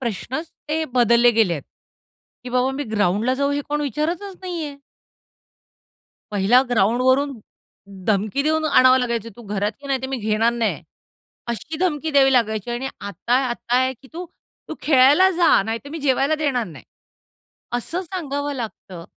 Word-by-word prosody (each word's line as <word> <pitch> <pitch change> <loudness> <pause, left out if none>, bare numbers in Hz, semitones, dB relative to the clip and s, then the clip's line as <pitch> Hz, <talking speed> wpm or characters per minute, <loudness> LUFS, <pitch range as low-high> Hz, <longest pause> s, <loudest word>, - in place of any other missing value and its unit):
प्रश्नच 255 - -4 0.2
ते 315 +1 0
बदलले 240 0 +5
गेलेत. 185 -10 +1 0.8
की - - -6
बाबा 250 +1 +1
मी 280 +2 -4
ग्राउंडला 210 +5 +1
जाऊ 280 +1 0
हे 285 - 0
कोण 295 0 -1
विचारतच 330 - -3
नाहीये! 330 -6 -5 1.6
पहिल्या 205 +5 +4
ग्राउंडवरून 255 +5 +2 0.7
धमकी 215 +5 +1
देऊन 315 +1 +1
आणावं 255 -4 +5
लागायचं, 235 -3 -2
"तू 240 - -11
घरात 205 0 -2
ये, - - -9
नाहीतर 265 -1 -1
मी 270 - -2
घेणार 220 0 +1
नाही." 235 -2 -1 0.6
अशी 240 +7 -5
धमकी 320 -3 -1
द्यावी 275 -2 +5
लागायची 220 -3 +1
आणि 240 +3 -3
आता 200 +4 -2
आता 240 0 -1
आहे 260 +1 +2
की 265 - -16
"तू 345 +2 -6 0.4
तू - - -5
खेळायला 290 +6 +5
जा 340 - +4
नाहीतर 225 +6 -5
मी 325 - -5
जेवायला 275 +2 +2
देणार 285 -6 0
नाही." 165 -4 -12 0.9
असं 330 +9 -3
सांगावं 290 -5 -4
लागतं. 205 -8 -7
260 Hz, 145 wpm, -21 LUFS, 230-290 Hz, 1.6 s, बदलले